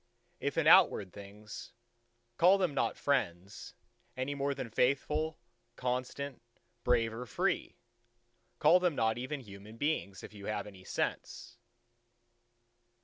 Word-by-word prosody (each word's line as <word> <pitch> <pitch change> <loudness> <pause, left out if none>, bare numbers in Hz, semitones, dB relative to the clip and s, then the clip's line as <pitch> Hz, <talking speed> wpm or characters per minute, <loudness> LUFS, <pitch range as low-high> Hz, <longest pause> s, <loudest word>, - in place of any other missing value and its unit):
If - - -2
in - - +2
outward 95 -3 +6
things, 105 +1 -10 0.6
call 185 +3 +6
them 180 -6 0
not - - 0
friends, 100 -9 -2 0.4
any 130 +2 -1
more 140 0 -1
than 130 -4 -5
faithful, 150 +6 +1 0.4
constant, 130 +2 -3 0.4
brave 115 -2 +2
or 125 +2 -6
free: 180 - -1 0.8
call 165 +4 +6
them 180 -4 +1
not 110 -1 +1
even 135 +3 -4
human 105 0 -12
beings, 130 -9 -2
if - - -10
you 100 -1 -9
have 105 - -2
any 95 -3 -12
sense. 120 +5 -4
125 Hz, 125 wpm, -32 LUFS, 105-145 Hz, 0.8 s, outward